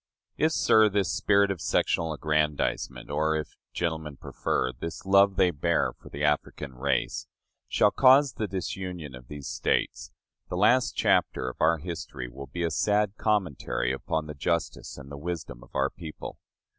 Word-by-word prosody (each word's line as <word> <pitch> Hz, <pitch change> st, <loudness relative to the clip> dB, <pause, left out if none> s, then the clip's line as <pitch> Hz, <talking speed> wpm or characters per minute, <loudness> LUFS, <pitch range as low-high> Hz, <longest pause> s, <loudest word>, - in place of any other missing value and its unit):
If, 155 Hz, +1 st, +2 dB
sir, 110 Hz, -6 st, +5 dB
this 100 Hz, -2 st, 0 dB
spirit 100 Hz, -1 st, +3 dB
of 90 Hz, -4 st, -4 dB
sectional 80 Hz, -1 st, +1 dB
aggrandizement 75 Hz, -1 st, -1 dB
or, 80 Hz, +2 st, +1 dB
if 75 Hz, -1 st, -4 dB, 0.2 s
gentlemen 80 Hz, -4 st, -3 dB
prefer, 65 Hz, -1 st, -1 dB
this 85 Hz, +3 st, -7 dB
love 100 Hz, 0 st, +5 dB
they 90 Hz, -1 st, +4 dB
bear 85 Hz, +2 st, 0 dB
the 70 Hz, +1 st, -6 dB
African 75 Hz, -2 st, -1 dB
race 65 Hz, +1 st, -1 dB, 0.4 s
shall 105 Hz, -, +3 dB
cause 135 Hz, +1 st, +6 dB
the 110 Hz, -, -3 dB
disunion 90 Hz, -5 st, -5 dB
of 60 Hz, -1 st, -11 dB
these 75 Hz, -2 st, -8 dB
States, -, -, -1 dB, 0.4 s
the 90 Hz, -, -3 dB
last 120 Hz, +6 st, +4 dB
chapter 65 Hz, -, +2 dB
of -, -, -21 dB
our 80 Hz, +1 st, +4 dB
history 80 Hz, -6 st, -6 dB
will 70 Hz, +3 st, -9 dB
be 85 Hz, +6 st, -4 dB
a 85 Hz, -, 0 dB
sad 105 Hz, -1 st, +1 dB
commentary 90 Hz, -, 0 dB
upon 80 Hz, +3 st, -2 dB
the 75 Hz, -, -6 dB
justice 85 Hz, +3 st, -2 dB
and 70 Hz, +1 st, -11 dB
the 70 Hz, -, -7 dB
wisdom 80 Hz, -7 st, -5 dB
of -, -, -17 dB
our 70 Hz, 0 st, +1 dB
people. 80 Hz, -3 st, -9 dB
80 Hz, 160 wpm, -27 LUFS, 70-95 Hz, 0.4 s, cause